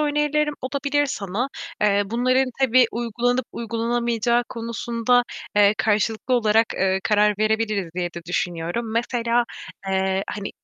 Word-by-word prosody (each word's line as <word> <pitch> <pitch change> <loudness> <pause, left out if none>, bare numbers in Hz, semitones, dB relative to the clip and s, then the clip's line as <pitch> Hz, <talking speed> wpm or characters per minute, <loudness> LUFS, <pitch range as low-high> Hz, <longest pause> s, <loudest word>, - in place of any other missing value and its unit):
önerilerim 295 0 +1
olabilir 285 +2 0
sana. 210 +2 -3 0.3
Eee, 205 -1 +3
bunların 255 +4 +2
tabii 255 -1 +5
uygulanıp 240 +2 0
uygulanamayacağı 235 +1 0
konusunda, 235 +1 0 0.3
eee, 205 0 +6
karşılıklı 220 +3 +1
olarak, 225 -1 +3
eee, 190 0 +1
karar 210 -1 +3
verebiliriz 215 -4 0
diye 175 -1 -1
de 170 - -5
düşünüyorum. 180 +6 -2
Mesela, 235 0 +1 0.4
eee, 190 0 +1
hani 200 -1 -5
230 Hz, 120 wpm, -23 LUFS, 210-245 Hz, 0.4 s, eee